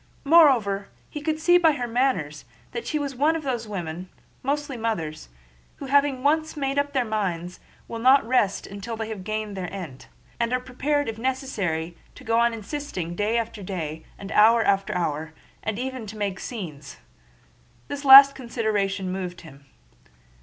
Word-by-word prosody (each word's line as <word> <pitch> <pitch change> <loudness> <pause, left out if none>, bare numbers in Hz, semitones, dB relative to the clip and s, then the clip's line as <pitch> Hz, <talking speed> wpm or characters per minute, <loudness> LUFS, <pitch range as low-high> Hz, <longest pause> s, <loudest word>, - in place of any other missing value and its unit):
Moreover, 260 -11 +4 0.2
he 300 - -6
could 310 +1 -1
see 350 +3 +4
by 325 -3 +4
her 250 -4 -3
manners 230 - -1 0.3
that 470 - -5
she 305 - -1
was 285 -2 -3
one 300 +5 +2
of 320 - -4
those 240 -5 -3
women—mostly 205 - -5
mothers—who, 150 - -6
having 280 -1 +2
once 310 +2 +1
made 275 0 0
up 285 0 -2
their 260 -3 +1
minds, 180 -5 -3 0.3
will 230 - -6
not 260 +3 +5
rest 225 -6 +1
until 200 +3 -7
they 225 0 -4
have 210 -4 -6
gained 215 0 -4
their 185 -2 -5
end, 170 -9 -8 0.3
and 235 +1 0
are 255 - +2
prepared 280 +4 -1
if 225 -1 -5
necessary 205 - -2 0.2
to - - -13
go 230 +1 +1
on 235 0 +3
insisting 225 - -5
day 210 +4 0
after 230 -2 -3
day 160 -5 -5
and 195 - -8
hour 225 +2 +5
after 195 -2 +1
hour, 155 -2 -2 0.3
and 220 -1 -3
even 255 -2 -5
to 215 +1 -8
make 200 -2 -2
scenes. 155 - -7 0.9
This 285 0 -5
last 275 0 +10
consideration 210 -6 -2
moved 185 -1 -5
him. 140 -4 -15
225 Hz, 165 wpm, -24 LUFS, 185-270 Hz, 0.9 s, last